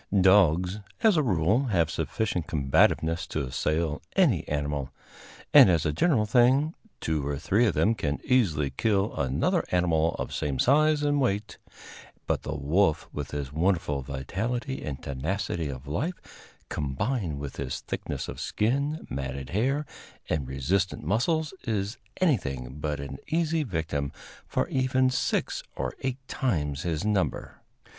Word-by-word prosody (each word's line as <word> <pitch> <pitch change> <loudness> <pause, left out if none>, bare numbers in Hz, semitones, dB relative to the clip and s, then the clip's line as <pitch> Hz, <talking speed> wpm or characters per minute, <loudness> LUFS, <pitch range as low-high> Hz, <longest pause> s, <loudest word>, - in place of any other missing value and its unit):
Dogs, 95 0 +4 0.2
as 220 -4 +6
a 155 - +4
rule, 105 - +2
have 85 - +1
sufficient 90 +1 -2
combativeness 80 +3 +2
to 70 - -2
assail 75 +4 -1
any 150 - +3
animal, 75 -2 -2 0.6
and, - - +10
as 85 -3 +2
a 75 - +1
general 120 - +3
thing, 130 +7 +4 0.3
two 75 -3 -1
or 70 -1 -1
three 105 - +2
of - - 0
them 110 - +3
can 75 -9 -2
easily 80 - +2
kill 100 - +1
another 65 -1 +1
animal 85 -2 +2
of - - -4
same 70 -3 -2
size 150 - +4
and 145 -1 +2
weight; 105 -4 -1 0.7
but - - 0
the - - -4
wolf, 80 +4 +1
with 75 -2 -4
his 70 -1 -4
wonderful 80 -4 +1
vitality 95 - -3
and 70 -3 -5
tenacity 80 +3 -2
of 65 0 -7
life, 145 - -5
combined 75 - -2
with 70 -1 -6
his 65 -2 -3
thickness - - -4
of - - -7
skin, 140 +8 -1
matted 65 0 -5
hair 135 - +1 0.4
and 70 -5 -1
resistant 85 +10 -1
muscles, 150 - +1
is 105 0 -2 0.2
anything 70 - 0
but 75 -1 -2
an 70 -1 -6
easy 165 0 +1
victim 80 - -2 0.4
for - - 0
even 130 0 +2
six - - 0
or 65 -1 -3
eight 130 -1 -2
times 75 - -1
his 85 +1 -2
number. 95 -10 -1
85 Hz, 145 wpm, -27 LUFS, 75-120 Hz, 0.7 s, and